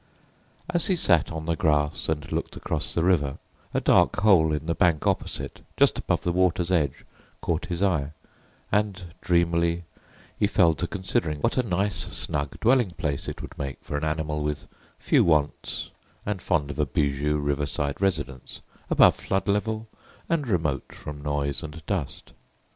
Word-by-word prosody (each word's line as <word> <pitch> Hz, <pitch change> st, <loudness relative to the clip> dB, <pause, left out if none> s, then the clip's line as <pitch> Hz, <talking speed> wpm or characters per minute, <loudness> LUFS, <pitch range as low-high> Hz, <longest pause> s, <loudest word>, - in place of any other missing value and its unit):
As 175 Hz, -2 st, +1 dB
he 190 Hz, -, +2 dB
sat 85 Hz, -, +3 dB
on 80 Hz, 0 st, -5 dB
the 85 Hz, 0 st, 0 dB
grass 75 Hz, -1 st, +1 dB
and 75 Hz, -2 st, -2 dB
looked -, -, -3 dB
across -, -, -1 dB
the 85 Hz, -, 0 dB
river, 75 Hz, -7 st, +2 dB, 0.3 s
a -, -, +1 dB
dark -, -, +4 dB
hole 90 Hz, -7 st, +5 dB
in 75 Hz, 0 st, -2 dB
the 85 Hz, -, 0 dB
bank 85 Hz, -4 st, +2 dB
opposite, -, -, -2 dB, 0.2 s
just -, -, +4 dB
above -, -, 0 dB
the 90 Hz, -, +1 dB
water's 90 Hz, 0 st, +1 dB
edge, 75 Hz, -7 st, 0 dB, 0.3 s
caught 85 Hz, +1 st, -2 dB
his 90 Hz, 0 st, -2 dB
eye, 80 Hz, -7 st, +1 dB, 0.6 s
and 95 Hz, -4 st, -1 dB
dreamily 85 Hz, 0 st, +2 dB, 0.6 s
he -, -, +4 dB
fell 85 Hz, -1 st, +4 dB
to 90 Hz, -, -3 dB
considering 90 Hz, -5 st, -1 dB
what -, -, +1 dB
a -, -, +6 dB
nice 100 Hz, -2 st, 0 dB
snug 70 Hz, -2 st, -3 dB
dwelling 120 Hz, -5 st, +3 dB
place 70 Hz, -3 st, -2 dB
it -, -, -5 dB
would -, -, -9 dB
make 70 Hz, -2 st, -4 dB
for 75 Hz, -, -5 dB
an 75 Hz, -, -2 dB
animal 75 Hz, -1 st, -1 dB
with 75 Hz, -1 st, -3 dB, 0.3 s
few -, -, +3 dB
wants 75 Hz, -3 st, 0 dB, 0.3 s
and 100 Hz, -3 st, -2 dB
fond 75 Hz, -5 st, 0 dB
of 70 Hz, -, -8 dB
a 75 Hz, -, +2 dB
bijou 70 Hz, +2 st, 0 dB
riverside 70 Hz, +1 st, -1 dB
residence, 70 Hz, -9 st, -2 dB, 0.3 s
above -, -, +6 dB
flood 95 Hz, +1 st, -2 dB
level 110 Hz, +2 st, 0 dB, 0.4 s
and 160 Hz, -5 st, 0 dB
remote 80 Hz, -, -1 dB
from 75 Hz, -1 st, -8 dB
noise 70 Hz, -1 st, -1 dB
and 80 Hz, 0 st, -9 dB
dust. 85 Hz, -9 st, -4 dB
80 Hz, 165 wpm, -26 LUFS, 75-95 Hz, 0.6 s, a